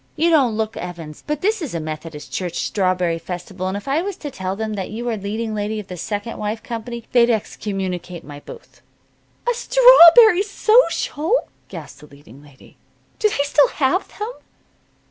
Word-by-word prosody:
You 330 +2 +2
don't 260 -9 +3
look 220 0 -2
Evans, 165 -4 -8
but 300 -1 -2
this 430 +1 0
is 285 - -5
a - - -1
Methodist 155 -1 -7
church 175 -2 -3
strawberry 180 -4 0
festival, 180 +2 -6
and 190 +2 -2
if 205 - -10
I 280 +4 +1
was 395 +1 -4
to 290 - -7
tell 190 -3 -4
them 220 +1 -4
that 195 -3 -4
you 235 +3 -5
are 230 - -1
leading 215 +2 -4
lady 210 +1 -3
of 205 - -10
the 180 - -6
'Second 205 +5 -5
Wife' 215 +2 -4
company 235 0 -6
they'd 240 -1 +4
excommunicate 190 -5 -3
my 145 0 -10
booth." 465 - -14 0.7
"A 485 - +3
strawberry 475 -5 +7
social!" 430 -2 +1 0.2
gasped - - -10
the 150 - -14
leading 140 -2 -17
lady. 145 -3 -19 0.4
"Do 425 - +3
they 285 - 0
still 285 0 +4
have 300 +7 0
them?" 425 +3 -4
215 Hz, 180 wpm, -20 LUFS, 180-300 Hz, 0.7 s, strawberry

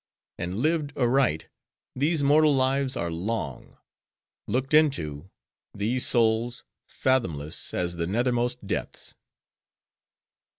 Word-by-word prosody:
And 90 +2 -3
lived 150 -1 0
aright, 125 - +2 0.5
these 150 +3 +1
mortal 150 +1 +5
lives 135 0 +1
are 85 0 -2
long; 85 - -4 0.7
looked 130 +3 -1
into, 95 - +2 0.5
these 115 +5 0
souls, 115 +1 +2 0.3
fathomless 85 - -1
as 85 -1 -2
the 85 0 -1
nethermost 120 +2 0
depths. - - -4
120 Hz, 95 wpm, -26 LUFS, 90-135 Hz, 0.7 s, mortal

